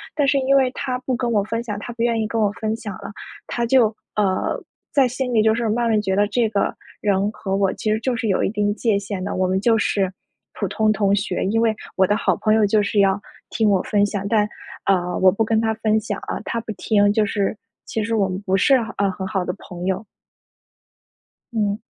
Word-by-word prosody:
但 290 -1 +2
是 280 - +3
因 270 +1 +2
为 265 -2 +4
他 255 -1 -3
不 255 0 -2
跟 245 -1 -1
我 210 -3 +2
分 225 +2 -3
享， 210 -4 -4
他 225 - -7
不 230 0 -2
愿 230 -1 +1
意 215 - -1
跟 225 +1 -2
我 205 -2 +2
分 220 +1 -2
享 215 -3 -6
了， - - -7 0.4
他 235 - -1
就， 240 -1 +5 0.3
呃， 195 -3 0 0.3
在 275 -3 +4
心 250 0 -3
里 220 - +4
就 220 0 +4
是 235 0 -1
慢 235 +2 +1
慢 220 -1 +3
觉 190 -2 -1
得 205 +1 +3
这 230 +2 +1
个 205 -2 0 0.3
人 200 0 +1
和 195 -2 -3
我 195 -1 +2
其 215 - -2
实 215 - +1
就 255 +1 0
是 230 -1 -2
有 190 - +2
一 - - +1
定 205 -1 0
界 220 -3 +1
限 200 -2 -5
的， 200 - -3
我 185 0 +1
们 190 +1 +1
就 230 +2 +4
是 195 -2 +1 0.4
普 - - -2
通 215 -1 +1
同 200 -2 +2
学。 195 - -1
因 225 +4 +1
为 225 -1 +2 0.2
我 190 - +4
的 205 - +2
好 - - +1
朋 215 - +2
友 220 0 +4
就 210 +1 +3
是 205 +1 0
要 195 0 +3 0.3
听 220 -2 +1
我 195 -2 +3
分 205 -1 +2
享， 200 -1 -3
但， 210 0 +2 0.4
呃， 180 -2 +1
我 185 0 +6
不 220 +4 0
跟 220 0 +2
他 220 -1 +1
分 220 -1 +1
享 205 -2 -4
啊， - - -3
他 230 - -2
不 225 - -6
听 205 0 +2
就 215 0 +2
是 200 0 -1 0.3
其 220 - -2
实 225 +2 -2
我 200 -3 +2
们 185 0 -3
不 190 -1 +1
是， 270 +8 +5 0.2
呃， 200 -1 +2
很 190 0 -5
好 190 -1 -1
的 180 - -2
朋 175 -1 -8
友。 190 +3 -1 1.5
嗯。 205 -2 0
210 Hz, 260 characters per minute, -21 LUFS, 200-230 Hz, 1.5 s, 我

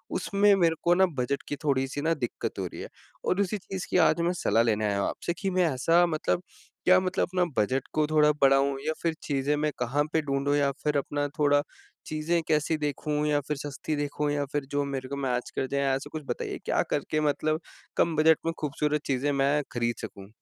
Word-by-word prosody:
उसमें, 200 0 +3
मेरे 170 -4 +3
को 175 - +4
ना 190 +1 +5
बजट 125 +3 -1
की 145 - -2
थोड़ी 135 -2 +2
सी 145 +2 -4
ना 165 +2 +2
दिक्कत 130 -7 -4
हो - - -1
रही - - -9
है - - -7 0.4
और 185 - +2
उसी 200 +1 -1
चीज़ 190 -1 -6
की - - +3
आज 170 - +1
मैं 175 +1 +1
सलाह 115 - +4
लेने 110 -2 +1
आया 100 -1 0
हूँ - - +1
आपसे 170 - -3
कि 195 - 0
मैं 185 0 +2
ऐसा 165 +7 +4
मतलब 170 +2 -1 0.4
क्या 185 +1 +7
मतलब 185 0 0
अपना 180 -1 +3 0.2
बजट 130 +5 -1
को 155 -1 +2
थोड़ा 150 -1 +4
बढ़ाऊँ 135 0 +4
या 155 - +1
फिर 165 -1 +1
चीज़ें 140 0 0
मैं 150 0 0
कहाँ 130 +4 +1
पे 160 - +3
ढूँढूँ 140 0 0
या 140 -1 +2
फिर 150 -1 +1
अपना 145 +1 -1
थोड़ा 145 -1 +4 0.4
चीज़ें 155 +2 0
कैसी 155 +1 +1
देखूँ 150 0 -1
या 145 -1 +2
फिर 150 - -1
सस्ती 145 +2 -4
देखूँ 145 0 -1
या 145 -1 0
फिर 145 -2 -1
जो 145 0 +1
मेरे 135 -2 -4
को 140 - -3
मैच 125 -3 -2
कर 130 - -1
जाएँ 140 +1 -1
ऐसा 135 - -5
कुछ 155 -1 -5
बताइए? 120 - -3
क्या - - +2
करके 155 +1 0
मतलब 155 +1 0 0.4
कम 165 -1 +2
बजट 155 +1 +5
में 165 - 0
खूबसूरत 150 0 -1
चीज़ें 140 +1 0
मैं 140 +1 +2
खरीद 120 -1 -1
सकूँ? 95 -1 -8
145 Hz, 220 wpm, -27 LUFS, 140-160 Hz, 0.4 s, क्या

